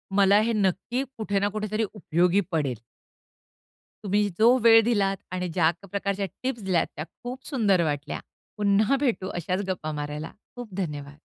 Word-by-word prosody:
मला 200 0 +6
हे 230 +1 +1
नक्की 210 +5 0
कुठे 205 -3 0
ना 200 - +1
कुठेतरी 215 +1 -1
उपयोगी 180 0 +2
पडेल. 145 -7 0 1.3
तुम्ही 205 +1 +2
जो 240 +4 +6
वेळ 225 -1 +8
दिलात 200 -4 +1
आणि 180 0 -2
ज्या 165 -1 +3 0.2
प्रकारच्या 200 0 -1 0.2
टिप्स 255 -4 -2
दिल्यात, 185 -3 +1
त्या 150 - -4 0.2
खूप 255 +2 -6
सुंदर 205 - +2
वाटल्या. 145 -1 -2 0.4
पुन्हा 210 +5 +3
भेटू 235 -9 0
अशाच 180 +3 -1
गप्पा 160 -4 -3
मारायला. 150 +1 -5 0.2
खूप 240 -6 -8
धन्यवाद. 145 -6 -4
200 Hz, 150 wpm, -26 LUFS, 170-220 Hz, 1.3 s, वेळ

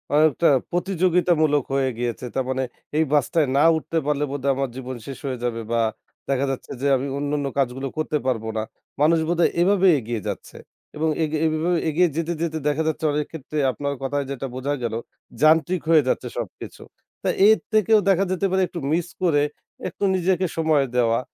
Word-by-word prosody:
অনেকটা 155 +2 +4 0.2
প্রতিযোগিতামূলক 175 -5 +2
হয়ে 135 -1 +2
গিয়েছে। 120 +1 -3
তার 130 -1 0
মানে 130 0 0 0.3
এই 160 - +4
বাসটায় 150 +2 +2
না 145 - +5
উঠতে 165 +1 -3
পারলে 150 0 0
বোধহয় 140 -1 0
আমার 135 0 -1
জীবন 130 -1 -6
শেষ 135 - -7
হয়ে 130 -3 -3
যাবে 115 -1 -2
বা 115 0 +2 0.5
দেখা 135 0 +1
যাচ্ছে 135 - -6
যে, 140 - +1
আমি 135 +2 -3
অন্যান্য 145 0 -1
কাজগুলো 135 0 0
করতে 155 -1 0
পারব 115 -4 0
না। 110 - 0 0.4
মানুষ 165 +2 +4
বোধহয় 175 0 +3
এভাবে 195 +1 +4
এগিয়ে 115 -2 -4
যাচ্ছে। - - -6 0.4
এবং 160 +1 +1
এগে 155 0 -1
এভাবে 160 +2 +1
এগিয়ে 175 +3 +3
যেতে, 165 +1 -1
যেতে 160 -1 -1
দেখা 150 +2 +1
যাচ্ছে 160 0 -1
অনেক 150 0 -1
ক্ষেত্রে 155 -1 -7
আপনার 140 +4 -3
কথায় 140 +1 -1
যেটা 135 0 -4
বোঝা 140 +3 -2
গেল, 115 -2 -2 0.5
যান্ত্রিক 160 +3 +4
হয়ে 160 -3 +6
যাচ্ছে 125 - 0
সবকিছু। 115 -6 -7 0.4
তা - - +1 0.2
এর 220 0 +6
থেকেও 215 0 +5
দেখা 195 +1 +3
যেতে 185 +1 0
পারে 190 - +2
একটু 175 - -6
মিস 170 0 0 0.2
করে 150 -5 +3 0.5
একটু 180 - -7
নিজেকে 185 0 +1
সময় 155 -4 +3
দেওয়া। 115 -2 +3
150 Hz, 180 wpm, -23 LUFS, 135-170 Hz, 0.5 s, হয়ে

